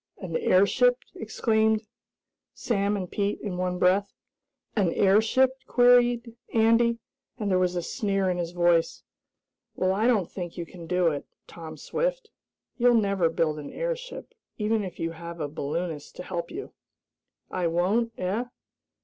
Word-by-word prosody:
"An 175 Hz, -4 st, -6 dB
airship?" 200 Hz, +9 st, +4 dB, 0.2 s
exclaimed 220 Hz, 0 st, +1 dB, 0.7 s
Sam 205 Hz, -3 st, 0 dB
and 185 Hz, -2 st, -4 dB
Pete 200 Hz, +2 st, -2 dB
in 190 Hz, -4 st, -4 dB
one 180 Hz, 0 st, -1 dB
breath. 190 Hz, +3 st, +2 dB, 0.6 s
"An 195 Hz, -6 st, +2 dB
airship?" 220 Hz, +6 st, +4 dB, 0.2 s
queried 245 Hz, -1 st, +4 dB, 0.2 s
Andy, 230 Hz, +1 st, +4 dB, 0.4 s
and 205 Hz, -3 st, -2 dB
there 185 Hz, -, +3 dB
was 180 Hz, -1 st, +1 dB
a 175 Hz, -, -1 dB
sneer 195 Hz, -4 st, -1 dB
in 180 Hz, -1 st, 0 dB
his 170 Hz, -1 st, -2 dB
voice. 175 Hz, -1 st, +1 dB, 0.7 s
"Well, 185 Hz, 0 st, +1 dB
I 215 Hz, +4 st, +1 dB
don't 210 Hz, -8 st, +2 dB
think 175 Hz, -2 st, -6 dB
you 170 Hz, -, -4 dB
can 170 Hz, 0 st, -11 dB
do 180 Hz, -1 st, +2 dB
it, 145 Hz, -2 st, -5 dB, 0.2 s
Tom 160 Hz, -2 st, -10 dB
Swift! -, -, -2 dB, 0.5 s
You'll 245 Hz, -1 st, +4 dB
never 200 Hz, -6 st, +2 dB
build 160 Hz, -2 st, 0 dB
an 145 Hz, -, -8 dB
airship; -, -, -5 dB, 0.2 s
even 215 Hz, 0 st, 0 dB
if 185 Hz, -3 st, -7 dB
you 165 Hz, 0 st, -2 dB
have 170 Hz, +1 st, -8 dB
a 150 Hz, -, -2 dB
balloonist 150 Hz, +2 st, -4 dB
to -, -, -7 dB
help 170 Hz, -2 st, -4 dB
you!" 400 Hz, -, -7 dB, 0.8 s
"I 180 Hz, -2 st, 0 dB
won't, 195 Hz, +8 st, +1 dB
eh?" 195 Hz, +7 st, -1 dB
195 Hz, 150 wpm, -26 LUFS, 175-225 Hz, 0.8 s, airship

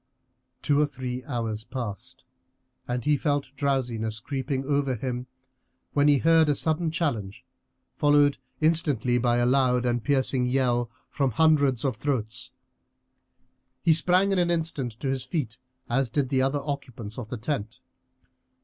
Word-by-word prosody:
Two 145 Hz, 0 st, +3 dB
or 150 Hz, -, +3 dB
three 130 Hz, -2 st, -5 dB
hours 115 Hz, -5 st, -3 dB
passed, 115 Hz, -7 st, -6 dB, 0.6 s
and 125 Hz, -1 st, -3 dB
he 150 Hz, 0 st, +4 dB
felt 145 Hz, -2 st, -1 dB
drowsiness 120 Hz, -6 st, -1 dB
creeping 135 Hz, +2 st, -3 dB
over 140 Hz, -2 st, +1 dB
him, 125 Hz, +1 st, -4 dB, 0.7 s
when 145 Hz, 0 st, +3 dB
he 145 Hz, -1 st, +5 dB
heard 160 Hz, +1 st, +4 dB
a 145 Hz, -, +3 dB
sudden 160 Hz, +3 st, +1 dB
challenge, 125 Hz, -, -3 dB, 0.5 s
followed 145 Hz, -1 st, +4 dB, 0.2 s
instantly 145 Hz, -7 st, +2 dB
by 120 Hz, 0 st, +2 dB
a 120 Hz, -, +2 dB
loud 125 Hz, -1 st, +3 dB
and 120 Hz, -2 st, 0 dB
piercing 130 Hz, -3 st, +1 dB
yell 125 Hz, -2 st, +1 dB, 0.2 s
from 135 Hz, -2 st, +1 dB
hundreds 145 Hz, -2 st, +3 dB
of 130 Hz, -5 st, 0 dB
throats. 115 Hz, -3 st, -3 dB, 1.3 s
He 165 Hz, -, +5 dB
sprang 180 Hz, +5 st, +3 dB
in 195 Hz, -, +2 dB
an 175 Hz, -1 st, +2 dB
instant 160 Hz, -8 st, -1 dB
to 140 Hz, -, -2 dB
his 130 Hz, -1 st, -1 dB
feet, 130 Hz, -, -4 dB, 0.3 s
as 130 Hz, +1 st, +1 dB
did 135 Hz, +1 st, 0 dB
the 135 Hz, -1 st, +2 dB
other 135 Hz, +2 st, +1 dB
occupants 125 Hz, -6 st, -5 dB
of 110 Hz, -3 st, -7 dB
the 125 Hz, -, -4 dB
tent. 110 Hz, -2 st, -4 dB
135 Hz, 150 wpm, -26 LUFS, 120-145 Hz, 1.3 s, he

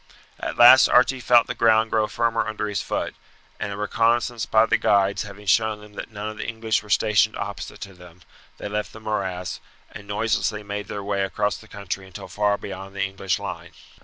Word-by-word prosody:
At -, -, -4 dB
last 120 Hz, +2 st, +9 dB
Archie 130 Hz, +1 st, +4 dB
felt 120 Hz, -1 st, +5 dB
the -, -, -4 dB
ground 110 Hz, 0 st, +3 dB
grow 110 Hz, -1 st, +2 dB
firmer 115 Hz, 0 st, 0 dB
under 110 Hz, -1 st, -3 dB
his 100 Hz, -1 st, -2 dB
foot, -, -, -3 dB, 0.5 s
and 100 Hz, -, -3 dB
a 100 Hz, -, -5 dB
reconnaissance 115 Hz, +2 st, 0 dB
by 110 Hz, 0 st, +4 dB
the -, -, +2 dB
guides 100 Hz, -1 st, +2 dB
having 105 Hz, 0 st, -9 dB
shown 110 Hz, +1 st, +2 dB
them 105 Hz, 0 st, -15 dB
that -, -, -7 dB
none 105 Hz, -1 st, -6 dB
of 110 Hz, 0 st, -6 dB
the 105 Hz, -, -5 dB
English 110 Hz, -1 st, -1 dB
were 105 Hz, -, -16 dB
stationed 105 Hz, +1 st, +3 dB
opposite 100 Hz, -2 st, -6 dB
to 100 Hz, -, -8 dB
them, 90 Hz, -1 st, -16 dB, 0.3 s
they -, -, -6 dB
left 105 Hz, +1 st, -3 dB
the 110 Hz, -, -10 dB
morass, 95 Hz, -4 st, -3 dB, 0.3 s
and 100 Hz, -, -11 dB
noiselessly 105 Hz, 0 st, -1 dB
made 100 Hz, 0 st, -5 dB
their 100 Hz, -1 st, -5 dB
way 100 Hz, 0 st, -1 dB
across 105 Hz, +2 st, -1 dB
the -, -, -15 dB
country 100 Hz, -1 st, -6 dB
until 95 Hz, -, -9 dB
far 105 Hz, -1 st, 0 dB
beyond 95 Hz, 0 st, -8 dB
the 100 Hz, -, -1 dB
English 95 Hz, -1 st, -2 dB
line. -, -, -7 dB
105 Hz, 205 wpm, -23 LUFS, 100-110 Hz, 0.5 s, last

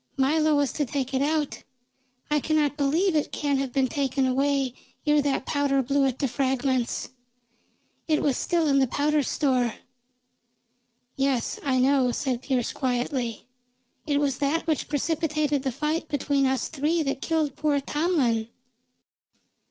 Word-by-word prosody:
Milo 305 Hz, +3 st, +3 dB
was 285 Hz, -2 st, +1 dB
to 300 Hz, -, 0 dB
take 270 Hz, 0 st, -3 dB
it 265 Hz, -, +1 dB
out. 300 Hz, 0 st, -1 dB, 0.7 s
I 300 Hz, -, +3 dB
cannot 300 Hz, -1 st, +1 dB
believe 315 Hz, +6 st, +1 dB
it 300 Hz, -, 0 dB
can 285 Hz, -2 st, 0 dB
have 270 Hz, -2 st, -2 dB
been 270 Hz, +1 st, +2 dB
taken 270 Hz, 0 st, 0 dB
away 270 Hz, 0 st, +1 dB, 0.3 s
ere 295 Hz, -1 st, +4 dB
that 280 Hz, -2 st, -1 dB
powder 280 Hz, -2 st, +1 dB
blew 275 Hz, +2 st, +2 dB
it 260 Hz, -1 st, -2 dB
to 275 Hz, -, 0 dB
fragments. 260 Hz, -1 st, -1 dB, 1.0 s
It 310 Hz, -2 st, +1 dB
was 280 Hz, -3 st, +2 dB
still 335 Hz, +4 st, 0 dB
in 275 Hz, -1 st, +4 dB
the 265 Hz, -, +3 dB
powder 295 Hz, +4 st, +1 dB
store." 255 Hz, -4 st, 0 dB, 1.4 s
"Yes, 270 Hz, -3 st, 0 dB
I 265 Hz, -2 st, +1 dB
know," 260 Hz, -1 st, +3 dB
said 255 Hz, -1 st, -2 dB
Pearse 255 Hz, -3 st, -1 dB
quietly. 245 Hz, -2 st, -2 dB, 0.6 s
"It 285 Hz, -1 st, +2 dB
was 280 Hz, -3 st, 0 dB
that 290 Hz, +4 st, 0 dB
which 315 Hz, -4 st, -1 dB
precipitated 300 Hz, -1 st, 0 dB
the 265 Hz, -1 st, -1 dB
fight 305 Hz, +5 st, -2 dB
between 285 Hz, -2 st, +1 dB
us 260 Hz, -2 st, 0 dB
three 315 Hz, +3 st, 0 dB
that 275 Hz, -1 st, -2 dB
killed 315 Hz, -4 st, 0 dB
poor 295 Hz, -2 st, +1 dB
Tomlin." 280 Hz, -7 st, 0 dB
280 Hz, 150 wpm, -26 LUFS, 265-300 Hz, 1.4 s, ere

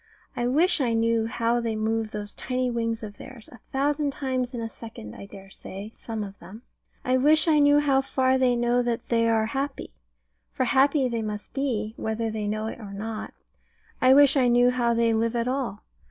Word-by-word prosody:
I 240 Hz, -, -1 dB
wish 310 Hz, +5 st, +3 dB
I 240 Hz, -3 st, +1 dB
knew 225 Hz, 0 st, +1 dB
how 235 Hz, 0 st, 0 dB
they 230 Hz, -2 st, -2 dB
move 220 Hz, 0 st, -1 dB
those 210 Hz, -1 st, -7 dB
tiny 255 Hz, -1 st, -2 dB
wings 230 Hz, -1 st, -2 dB
of 205 Hz, -1 st, -8 dB
theirs 235 Hz, -4 st, -11 dB
a 245 Hz, -, -14 dB
thousand 285 Hz, +1 st, 0 dB
times 255 Hz, -3 st, -2 dB
in -, -, -4 dB
a 225 Hz, -, -3 dB
second, 220 Hz, -, -10 dB
I 200 Hz, -, -10 dB
dare 195 Hz, -1 st, -13 dB
say, 200 Hz, +3 st, -9 dB
some 225 Hz, -2 st, -5 dB
of 200 Hz, 0 st, -9 dB
them. 205 Hz, +7 st, -12 dB, 0.4 s
I 255 Hz, 0 st, +3 dB
wish 305 Hz, +5 st, +4 dB
I 310 Hz, -2 st, +4 dB
knew 290 Hz, 0 st, +5 dB
how 275 Hz, -2 st, +3 dB
far 260 Hz, -1 st, +1 dB
they 250 Hz, -1 st, +3 dB
know 240 Hz, +1 st, +2 dB
that 240 Hz, -1 st, -3 dB
they 230 Hz, -1 st, +2 dB
are 220 Hz, -1 st, +2 dB
happy 270 Hz, +4 st, -4 dB, 0.6 s
for -, -, -1 dB
happy 275 Hz, 0 st, +3 dB
they 235 Hz, -2 st, -2 dB
must 210 Hz, -1 st, -6 dB
be, 225 Hz, -6 st, -2 dB
whether 220 Hz, 0 st, -2 dB
they 215 Hz, -1 st, -3 dB
know 215 Hz, +1 st, -2 dB
it 220 Hz, -, -6 dB
or 205 Hz, -3 st, -9 dB
not. 215 Hz, +2 st, -6 dB, 0.7 s
I 255 Hz, +1 st, +6 dB
wish 285 Hz, 0 st, +6 dB
I 260 Hz, -3 st, +3 dB
knew 245 Hz, +1 st, +4 dB
how 240 Hz, -2 st, +1 dB
they 230 Hz, 0 st, +2 dB
live 225 Hz, +1 st, 0 dB
at 235 Hz, 0 st, 0 dB
all. 250 Hz, -6 st, -3 dB
235 Hz, 210 wpm, -25 LUFS, 220-260 Hz, 0.7 s, I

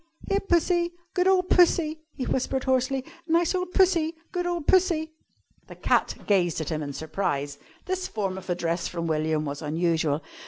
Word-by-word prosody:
"Here, 395 Hz, -, +2 dB
Pussy! 345 Hz, -2 st, +1 dB, 0.2 s
Good 360 Hz, 0 st, +2 dB
ole 380 Hz, -1 st, +4 dB
Pussy!" 335 Hz, -3 st, +3 dB
he 260 Hz, -, -3 dB
whispered 265 Hz, 0 st, -1 dB
hoarsely. 260 Hz, 0 st, +1 dB, 0.2 s
"Nice 335 Hz, +1 st, +2 dB
ole 365 Hz, 0 st, -1 dB
Pussy! 350 Hz, -3 st, +2 dB, 0.2 s
Good 355 Hz, -2 st, -2 dB
ole 350 Hz, -1 st, -1 dB
Pussy!" 335 Hz, -2 st, +2 dB, 0.6 s
The -, -, -11 dB
cat -, -, +1 dB
gazed 180 Hz, -6 st, +2 dB
at 160 Hz, -, -3 dB
him 155 Hz, -2 st, -2 dB
in 145 Hz, -1 st, -4 dB
surprise. 145 Hz, -2 st, -3 dB, 0.3 s
This 370 Hz, 0 st, -2 dB
form 195 Hz, -4 st, -3 dB
of 190 Hz, 0 st, -9 dB
address 170 Hz, -1 st, -1 dB
from 170 Hz, -1 st, -4 dB
William 155 Hz, -1 st, 0 dB
was 145 Hz, +1 st, -5 dB
unusual. 160 Hz, -1 st, 0 dB
260 Hz, 165 wpm, -26 LUFS, -, 0.6 s, ole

